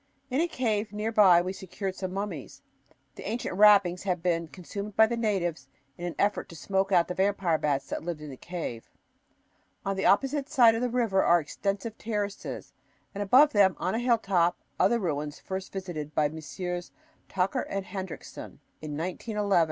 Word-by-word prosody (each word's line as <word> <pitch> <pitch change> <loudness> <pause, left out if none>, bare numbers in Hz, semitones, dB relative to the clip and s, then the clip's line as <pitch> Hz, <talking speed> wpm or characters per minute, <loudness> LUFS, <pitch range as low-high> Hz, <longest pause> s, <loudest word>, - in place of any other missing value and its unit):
In 265 +5 +2
a 345 - +2
cave 220 - -1
near 210 +2 -2
by 185 -6 +6
we 185 +1 -3
secured 190 +1 -5
some 185 -1 -4
mummies. 190 -7 -5 0.5
The - - -7
ancient 230 -4 -3
wrappings 195 -3 +6
had 180 -3 -2
been 170 -2 0
consumed 200 +4 -7
by 220 - +7
the 235 +2 -2
natives 175 - -1 0.3
in 175 - -6
an 175 - -5
effort 205 +1 0
to 165 - -10
smoke 195 +3 -1
out 175 -3 +4
the 180 - -3
vampire 190 -4 +1
bats 140 -2 0
that - - -4
lived 170 -2 -4
in 150 -1 -8
the - - -8
cave. 155 -7 -6 1.0
On 195 0 0
the 190 - +1
opposite 275 +6 +2
side 235 -6 +6
of 225 - -2
the 250 - 0
river 230 -6 +2
are 175 0 +5
extensive 200 +7 -3
terraces 205 -3 -4 0.4
and 200 - -4
above 260 +9 +6
them, 195 -3 +5
on 185 - -1
a 225 - 0
hilltop, 195 -8 +2 0.2
other 235 - +4
ruins 150 -7 -3
first 190 0 -5
visited 170 -6 -6
by 150 -1 +3
Messrs. 175 +4 -5 0.4
Tucker 185 0 0
and 195 -1 -4
Hendriksen 190 -2 -7 0.2
in 150 -2 -5
1911. 200 +3 0
190 Hz, 180 wpm, -28 LUFS, 175-210 Hz, 1.0 s, by